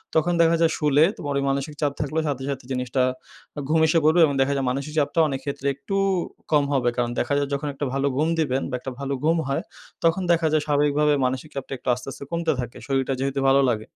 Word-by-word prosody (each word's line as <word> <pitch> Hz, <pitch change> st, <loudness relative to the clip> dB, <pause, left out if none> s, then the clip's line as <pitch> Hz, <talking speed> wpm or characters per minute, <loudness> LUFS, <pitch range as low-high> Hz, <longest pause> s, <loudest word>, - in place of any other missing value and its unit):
তখন 165 Hz, +2 st, +3 dB
দেখা 165 Hz, 0 st, +4 dB
যায় 165 Hz, -1 st, +4 dB
শুলে 150 Hz, 0 st, +4 dB
তোমার 145 Hz, -1 st, -4 dB
ওই -, -, -1 dB
মানসিক 140 Hz, +2 st, -2 dB
চাপ 145 Hz, -1 st, +2 dB
থাকলে, 150 Hz, +2 st, -1 dB
সাথে, 135 Hz, -2 st, -2 dB
সাথে 135 Hz, -2 st, -4 dB
জিনিসটা 125 Hz, 0 st, -1 dB, 0.6 s
এ -, -, -2 dB
ঘুম 160 Hz, 0 st, +3 dB
এসে 165 Hz, +1 st, +3 dB
পড়বে 165 Hz, +2 st, +5 dB
এবং 145 Hz, -, -1 dB
দেখা 140 Hz, +1 st, +2 dB
যায়, 135 Hz, -1 st, -1 dB
মানসিক 140 Hz, +3 st, -4 dB
চাপটা 150 Hz, +3 st, +1 dB
অনেক 135 Hz, -2 st, -3 dB
ক্ষেত্রে 140 Hz, 0 st, -3 dB
একটু 140 Hz, +8 st, -5 dB, 0.6 s
কম 150 Hz, -2 st, +4 dB
হবে।" 125 Hz, -3 st, +2 dB
কারণ 120 Hz, -1 st, 0 dB
দেখা 125 Hz, -, 0 dB
যায় 145 Hz, -, 0 dB
যখন 145 Hz, +1 st, -2 dB
একটা 145 Hz, +1 st, -3 dB
ভালো 140 Hz, +1 st, +1 dB
ঘুম 155 Hz, +2 st, +2 dB
দিবেন 135 Hz, -3 st, +1 dB
বা 125 Hz, -, -2 dB
একটা 130 Hz, -, -6 dB
ভালো 140 Hz, 0 st, -2 dB
ঘুম 165 Hz, +2 st, +3 dB
হয়, 135 Hz, -, -1 dB, 0.4 s
তখন 165 Hz, +3 st, +3 dB
দেখা 165 Hz, -1 st, +3 dB
যায় 155 Hz, -1 st, +2 dB
স্বাভাবিকভাবে 145 Hz, 0 st, +2 dB
মানসিক 130 Hz, +4 st, -2 dB
চাপটা 135 Hz, 0 st, -5 dB
একটু 125 Hz, -, -17 dB
আস্তে 125 Hz, +2 st, -6 dB
আস্তে, 140 Hz, -, -9 dB
কমতে 170 Hz, -1 st, 0 dB
থাকে। 120 Hz, -1 st, -5 dB
শরীরটা 135 Hz, 0 st, 0 dB
যেহেতু 135 Hz, +1 st, -1 dB
ভালো 135 Hz, +1 st, +5 dB
লাগে। 110 Hz, -1 st, -4 dB
140 Hz, 230 wpm, -24 LUFS, 135-155 Hz, 0.6 s, পড়বে